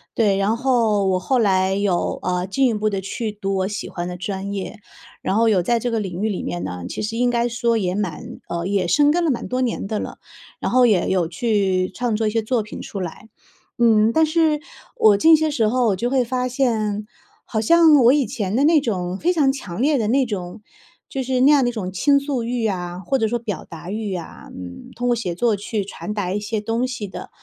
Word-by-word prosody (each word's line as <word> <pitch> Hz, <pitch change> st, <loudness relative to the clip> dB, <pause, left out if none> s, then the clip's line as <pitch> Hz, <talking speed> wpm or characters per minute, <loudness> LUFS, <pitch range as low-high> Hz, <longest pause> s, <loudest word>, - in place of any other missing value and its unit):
对， 205 Hz, -4 st, +2 dB
然 200 Hz, +3 st, +1 dB
后 230 Hz, -6 st, +2 dB
我 185 Hz, -1 st, +1 dB
后 260 Hz, +7 st, 0 dB
来 190 Hz, -3 st, +2 dB
有， 195 Hz, -3 st, 0 dB
呃， 180 Hz, 0 st, -1 dB
进 265 Hz, +7 st, +2 dB
一 230 Hz, -, +1 dB
步 215 Hz, 0 st, 0 dB
地 195 Hz, -2 st, -3 dB
去 215 Hz, +3 st, -4 dB
读 195 Hz, -2 st, -3 dB
我 190 Hz, 0 st, 0 dB
喜 210 Hz, -, -5 dB
欢 175 Hz, 0 st, -5 dB
的 180 Hz, -, -5 dB
专 195 Hz, +2 st, -4 dB
业， 200 Hz, +2 st, -5 dB, 0.4 s
然 195 Hz, -, -1 dB
后 225 Hz, 0 st, +4 dB
有 195 Hz, -4 st, +3 dB
在 235 Hz, +7 st, +1 dB
这 240 Hz, +1 st, -2 dB
个 225 Hz, -, 0 dB
领 190 Hz, -2 st, -4 dB
域 220 Hz, -, +1 dB
里 200 Hz, -, -3 dB
面 175 Hz, -, -4 dB
呢， 90 Hz, 0 st, -5 dB
其 -, -, -5 dB
实 225 Hz, +2 st, -3 dB
应 245 Hz, 0 st, +2 dB
该 240 Hz, 0 st, +1 dB
说 235 Hz, -1 st, 0 dB
也 185 Hz, -4 st, -1 dB
蛮 190 Hz, -6 st, -4 dB
呃， 170 Hz, 0 st, -3 dB
也 195 Hz, -2 st, 0 dB
生 290 Hz, +11 st, +4 dB
根 345 Hz, +2 st, +1 dB
了 310 Hz, -, +2 dB
蛮 240 Hz, -, -4 dB
多 255 Hz, -, -1 dB
年 240 Hz, -5 st, -1 dB
的 210 Hz, +1 st, -2 dB
了， -, -, -6 dB, 0.4 s
然 -, -, -1 dB
后 250 Hz, 0 st, +5 dB
也 205 Hz, -6 st, +2 dB
有 180 Hz, -3 st, +1 dB
去 190 Hz, -1 st, 0 dB
创 240 Hz, -1 st, -1 dB
作 220 Hz, -, 0 dB
一 -, -, +2 dB
些 225 Hz, -, +1 dB
作 220 Hz, 0 st, 0 dB
品 210 Hz, -, -9 dB
出 195 Hz, -, -6 dB
来。 180 Hz, +5 st, -7 dB, 0.5 s
嗯， 225 Hz, -2 st, +4 dB
但 320 Hz, 0 st, +4 dB
是 315 Hz, -1 st, +2 dB, 0.3 s
我 210 Hz, -2 st, +5 dB
近 320 Hz, +7 st, +7 dB
些 310 Hz, -1 st, +1 dB
时 225 Hz, -7 st, +1 dB
候 245 Hz, +1 st, +2 dB
我 200 Hz, -, +2 dB
就 240 Hz, +6 st, -2 dB
会 260 Hz, -1 st, +2 dB
发 250 Hz, +1 st, -1 dB
现， 220 Hz, -5 st, 0 dB, 0.4 s
好 220 Hz, -, -2 dB
像 325 Hz, +5 st, +6 dB
我 235 Hz, -, +7 dB
以 285 Hz, -1 st, +2 dB
前 205 Hz, -4 st, -3 dB
的 265 Hz, +5 st, +3 dB
那 310 Hz, -2 st, +5 dB
种 185 Hz, -6 st, -2 dB
非 345 Hz, -, +1 dB
常 285 Hz, -6 st, +2 dB
强 205 Hz, -7 st, -6 dB
烈 295 Hz, +1 st, +3 dB
的 220 Hz, -3 st, 0 dB
那 265 Hz, +2 st, +3 dB
种 195 Hz, -2 st, -6 dB, 0.5 s
就 265 Hz, -1 st, -3 dB
是 255 Hz, 0 st, 0 dB
那 260 Hz, +3 st, +5 dB
样 290 Hz, -3 st, +5 dB
的 245 Hz, -, +2 dB
一 -, -, -3 dB
种 210 Hz, -6 st, -4 dB
倾 280 Hz, +10 st, +3 dB
诉 280 Hz, -4 st, -2 dB
欲 235 Hz, -1 st, -1 dB
啊， 180 Hz, -3 st, -4 dB
或 230 Hz, +9 st, 0 dB
者 225 Hz, -, +1 dB
说 240 Hz, +1 st, -1 dB
表 220 Hz, -4 st, -5 dB
达 170 Hz, +1 st, -10 dB
欲 210 Hz, -1 st, -3 dB
啊， 170 Hz, -3 st, -9 dB
嗯， 90 Hz, -1 st, -9 dB
通 245 Hz, +1 st, -1 dB
过 240 Hz, -, +3 dB
写 195 Hz, -7 st, -3 dB
作 225 Hz, +4 st, +1 dB
去 205 Hz, 0 st, -3 dB
传 210 Hz, +1 st, -6 dB
达 190 Hz, -3 st, -2 dB
一 205 Hz, -, -2 dB
些 215 Hz, +1 st, -2 dB
东 225 Hz, +3 st, -1 dB
西 235 Hz, -5 st, -5 dB
的 190 Hz, -, -9 dB
220 Hz, 265 characters per minute, -21 LUFS, 195-250 Hz, 0.5 s, 近